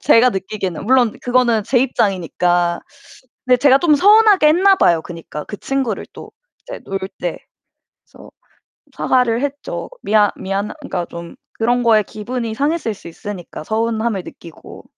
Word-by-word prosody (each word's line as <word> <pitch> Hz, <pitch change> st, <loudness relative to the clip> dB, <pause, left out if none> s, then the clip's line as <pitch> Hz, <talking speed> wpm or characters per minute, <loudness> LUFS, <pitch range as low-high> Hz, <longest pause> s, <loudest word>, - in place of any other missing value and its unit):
제가 245 Hz, +2 st, +5 dB
느끼기에는. 190 Hz, -3 st, -4 dB
물론 250 Hz, -3 st, +3 dB
그거는 245 Hz, -3 st, +2 dB
제 245 Hz, +4 st, +1 dB
입장이니까. 175 Hz, -7 st, 0 dB, 0.7 s
근데 250 Hz, 0 st, +5 dB
제가 270 Hz, 0 st, +5 dB
좀 315 Hz, -1 st, +3 dB
서운하게 410 Hz, -2 st, +5 dB
했나 380 Hz, +5 st, +5 dB
봐요. 165 Hz, -2 st, +3 dB
그니까 165 Hz, -3 st, -8 dB
그 205 Hz, -, -8 dB
친구를 265 Hz, -5 st, -2 dB
또 -, -, -12 dB, 0.3 s
이제 -, -, -9 dB
놀 195 Hz, 0 st, -3 dB, 0.2 s
때. 175 Hz, -2 st, -3 dB, 0.7 s
그래서 -, -, -16 dB, 0.7 s
사과를 250 Hz, -1 st, +1 dB
했죠. 285 Hz, -, -5 dB
미안 210 Hz, -1 st, +3 dB
미안 195 Hz, +2 st, -3 dB
그니까 180 Hz, -2 st, -4 dB
좀 170 Hz, 0 st, -9 dB, 0.2 s
그런 245 Hz, +2 st, +1 dB
거에 225 Hz, -3 st, +4 dB
기분이 225 Hz, +2 st, -5 dB
상했을 285 Hz, -2 st, -1 dB
수 -, -, -16 dB
있으니까 175 Hz, -3 st, -8 dB
서운함을 220 Hz, -1 st, -1 dB
느끼고. 165 Hz, -2 st, -13 dB
225 Hz, 325 characters per minute, -18 LUFS, 195-260 Hz, 0.7 s, 제가